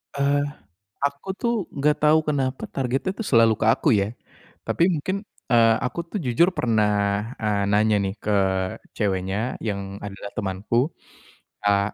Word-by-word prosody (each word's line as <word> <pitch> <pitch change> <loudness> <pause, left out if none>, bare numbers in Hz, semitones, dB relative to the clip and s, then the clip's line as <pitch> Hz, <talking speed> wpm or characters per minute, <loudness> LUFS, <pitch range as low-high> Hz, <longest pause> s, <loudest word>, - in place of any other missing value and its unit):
Eee, 140 0 +2 0.6
aku 140 +5 -2
tuh 235 +1 0 0.2
enggak 150 +2 +2
tahu 155 +1 +5
kenapa, 135 -3 -1
targetnya 135 +8 -1
tuh 215 +1 -6
selalu 115 -5 +5
ke - - +2
aku, 115 - +3
ya. 100 -2 +2 0.6
Tapi, 170 - +2
mungkin, 185 +2 -1 0.4
eee, 115 -1 +6
aku 150 - -2
tuh 205 - -3
jujur 135 +6 +3
pernah, 105 -1 +1
eee, 105 -2 0
nanya 105 +1 +3
nih 95 -1 -2
ke 100 -2 +1 0.5
ceweknya, 100 +3 -1
yang 100 -2 -4
adalah 100 0 -7
temanku, 105 +7 0 0.7
eee, 100 0 +2
115 Hz, 140 wpm, -24 LUFS, 100-140 Hz, 0.7 s, eee